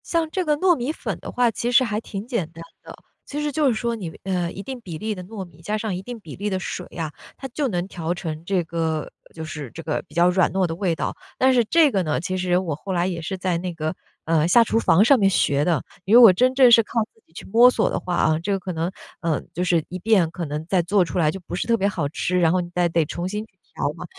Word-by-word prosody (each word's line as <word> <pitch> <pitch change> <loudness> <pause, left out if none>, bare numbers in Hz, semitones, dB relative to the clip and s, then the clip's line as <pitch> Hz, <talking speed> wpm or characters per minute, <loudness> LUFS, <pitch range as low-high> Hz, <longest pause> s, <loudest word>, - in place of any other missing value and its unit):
像 330 -2 0
这 370 - -1
个 300 -1 +2
糯 360 +2 +4
米 250 +2 -2
粉 - - -5
的 - - -8
话 245 -1 +2
其 235 +3 -2
实 250 +2 +6
还 210 -3 -1
挺 200 -2 -6
简 235 - -2
单 165 0 -10 0.2
的， - - -10 0.3
其 295 +1 -4
实 295 0 -1
就 300 0 +1
是 255 - +3
说 235 +1 -2
你 190 -7 -5
呃， 180 -3 -1
一 195 - -8
定 260 +1 -6
比 175 -7 -7
例 215 +5 -3
的 185 -3 -8
糯 195 -1 -7
米， 165 -2 -18
加 210 +5 -2
上 215 -3 -3
一 180 - -5
定 240 +4 -8
比 160 -8 -10
例 205 +2 -3
的 190 -2 -1
水 185 -1 -5
啊， 160 -3 -3 0.3
它 270 - -6
就 280 +3 -1
能 180 -5 -2
调 170 -3 -3
成 160 -3 -6
这 185 -1 0
个 160 -1 -2 0.2
就 160 - -7
是 150 -4 -7
这 165 - -9
个 155 - -2
比 150 - -18
较 175 +1 +5
软 180 -2 +2
糯 190 +1 +1
的 165 -1 -3
味 175 -2 0
道。 - - -3 0.2
但 260 0 +4
是 245 -2 +4
这 315 +4 +4
个 195 - +1
呢， 155 -3 -1
其 185 +2 -3
实 180 -1 +1
我 175 -5 -2
后 190 +6 -5
来 175 -1 +1
也 175 -3 -3
是 190 +4 -4
在 185 -2 -1
那 180 0 -4
个， 155 +1 -3 0.3
呃， 160 -1 +2
下 230 +7 +6
厨 225 0 +1
房 205 -1 +4
上 270 +1 +5
面 195 -2 +4
学 145 -6 +2
的， 165 -4 +1 0.2
因 205 +5 +4
为 - - +9
我 210 -5 +9
真 255 +7 +2
正 260 -2 +7
是 230 - +8
靠 230 +2 -1
自 225 - -29
己 - - -30
去 - - -9
摸 235 +4 +6
索 - - +1
的 - - -2
话， 180 -1 -3
啊， 155 -2 +2
这 185 +5 -3
个 195 - +1
可 185 -1 -5
能 165 +2 -2 0.3
嗯， 165 -3 -1
就 180 - -2
是 175 -3 +2
1 185 - -6
遍 185 -4 +3
可 170 0 -4
能 150 +1 -4
再 185 -1 +2
做 185 +2 +2
出 180 - -3
来 155 -3 +3
就 190 - -4
不 175 - -6
是 185 - -3
特 230 -1 +3
别 200 - +1
好 165 -8 -2
吃， 180 +4 -1
然 165 -2 +4
后 185 - +2
你 175 -1 -4
再 175 -1 +2
得 165 -1 +1
重 175 +4 -4
新 210 +2 -4
去 - - -30 0.2
调 - - 0
嘛， - - -8
185 Hz, 310 characters per minute, -23 LUFS, 165-225 Hz, 0.3 s, 为